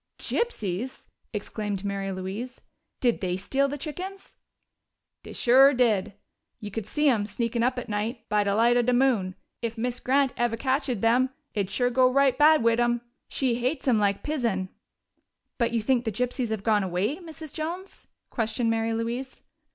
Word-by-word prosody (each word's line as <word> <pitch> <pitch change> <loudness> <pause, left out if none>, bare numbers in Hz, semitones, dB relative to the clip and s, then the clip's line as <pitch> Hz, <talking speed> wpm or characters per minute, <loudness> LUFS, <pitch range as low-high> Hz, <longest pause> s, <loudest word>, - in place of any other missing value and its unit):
"Gypsies!" 245 - -2 0.3
exclaimed 205 -2 -4
Mary 195 -1 -2
Louise. 195 +7 -5 0.4
"Did 240 -2 +2
they 180 -1 -1
steal 270 +8 +1
the 285 +1 -4
chickens?" 365 +7 -6 0.9
"Dey - - -11
sure 265 +3 +6
did. 220 -6 +2 0.5
We 205 -1 -7
could 215 0 -4
see 300 0 +1
'em, 220 -6 +2
sneakin' 230 +3 -2
up 250 +2 +1
at 245 - -4
night, 220 +3 -3
by 210 -1 +2
de 200 0 0
light 235 +2 +4
of 240 -1 +2
de 250 - +4
moon. 240 -8 +2 0.3
If 230 0 -3
Miz 245 +2 -2
Grant 270 0 +2
eve' 240 -1 +1
catched 270 +3 0
'em, 245 +3 +4 0.2
it'd 200 -3 -1
sure 245 +5 +1
go 255 +1 +4
right 275 -1 +4
bad 300 -1 +5
wid 230 0 +3
'em. 240 0 +2 0.3
She 260 -3 0
hates 260 +3 -1
'em 235 -4 +4
like 200 -1 +1
pison." 230 -11 -1 0.9
"But 235 -1 +2
you 230 -2 0
think 250 +1 +2
the 220 - 0
gypsies 245 +2 -1
have 220 -3 -3
gone 215 -2 +3
away, 190 - -1
Mrs. 320 -4 -10
Jones?" 345 +5 -6 0.2
questioned 225 0 0
Mary 225 0 0
Louise. 240 +4 -4
235 Hz, 175 wpm, -26 LUFS, 210-265 Hz, 0.9 s, sure